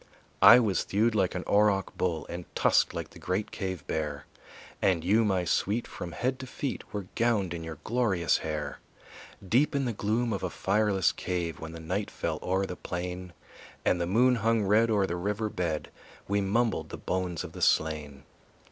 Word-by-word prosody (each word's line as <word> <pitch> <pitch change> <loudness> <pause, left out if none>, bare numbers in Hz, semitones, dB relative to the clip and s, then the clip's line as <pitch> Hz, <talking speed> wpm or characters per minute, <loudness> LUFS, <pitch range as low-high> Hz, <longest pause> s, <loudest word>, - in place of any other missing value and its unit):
I 120 - +10
was 105 -7 +2
thewed 110 +3 +1
like 95 -4 +1
an 90 - -2
Auroch 100 -2 +2
bull 85 -4 -1
And 85 0 -6
tusked - - +3
like - - -6
the - - -13
great 95 +3 -2
cave 95 -6 -4
bear; 75 -3 -3 0.6
And 90 -4 +2
you, 105 +6 +4
my 95 -4 +1
sweet, 105 +7 0
from 85 -1 -7
head 130 +2 -1
to 130 - -7
feet 135 +1 -5
Were 100 -2 -4
gowned 110 -6 +1
in 85 -1 -5
your 80 -2 -7
glorious 105 -8 +1
hair. 75 -2 -4 0.7
Deep 140 - +3
in 140 -1 +1
the 120 - -1
gloom 110 +3 0
of 100 - -3
a 95 - -2
fireless 100 0 +2
cave, 85 -3 -3
When 80 0 -7
the 85 - -8
night 95 +6 -2
fell - - -3
o'er 95 +1 0
the 90 - -6
plain 90 0 -5 0.5
And 90 - +2
the 85 - 0
moon 125 +6 +4
hung 115 0 +2
red 105 +4 +4
o'er 105 -3 +3
the 85 - -3
river 105 +4 -2
bed 85 -5 -3 0.4
We 100 +1 +1
mumbled 110 +3 0
the - - -6
bones 90 -3 -2
of - - -8
the - - -9
slain. 75 -3 +1
95 Hz, 190 wpm, -29 LUFS, 85-110 Hz, 0.7 s, I